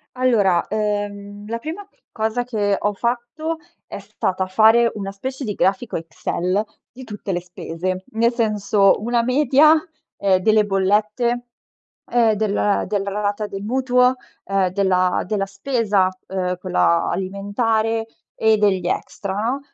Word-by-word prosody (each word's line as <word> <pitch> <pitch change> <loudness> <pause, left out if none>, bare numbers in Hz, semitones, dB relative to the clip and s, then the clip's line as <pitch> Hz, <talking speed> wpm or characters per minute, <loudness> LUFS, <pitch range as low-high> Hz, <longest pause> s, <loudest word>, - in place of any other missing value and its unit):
Allora, 210 -9 +2
uhm, 205 -1 -3
la 230 +1 -3
prima 350 +9 -7 0.2
cosa 220 +2 -1
che 205 -5 0
ho 205 0 0
fatto 245 +9 -3 0.3
è - - -8
stata 190 -2 -2
fare 225 +4 +5
una 195 -1 -4
specie 260 +7 -6
di 210 -3 -2
grafico 195 +5 0
Excel 180 +4 -2 0.3
di 260 +1 -11
tutte 210 -3 -6
le 175 -1 -1
spese. 180 +1 -5
Nel 235 +2 +2
senso, 210 -3 +3
una 235 +1 +1
media, 280 +4 +5 0.4
ehm, 190 -2 +2
delle 215 +1 +4
bollette, 210 +5 +1 0.7
e 225 -3 +3
del 205 -1 +1
della 200 -1 -2
rata 205 +1 -2
del 195 0 -6
mutuo, 250 +1 +3 0.3
uhm, 195 -1 +1
della 185 -1 +1
della 195 -1 -1
spesa, 205 -4 +1 0.2
uhm, 180 -1 -2
quella 180 -2 +1
alimentare 220 +4 -1 0.3
e 220 -1 +3
degli 190 -4 +2
extra, 195 +2 -3
no? 230 +7 -1
210 Hz, 135 wpm, -21 LUFS, 195-235 Hz, 0.7 s, fare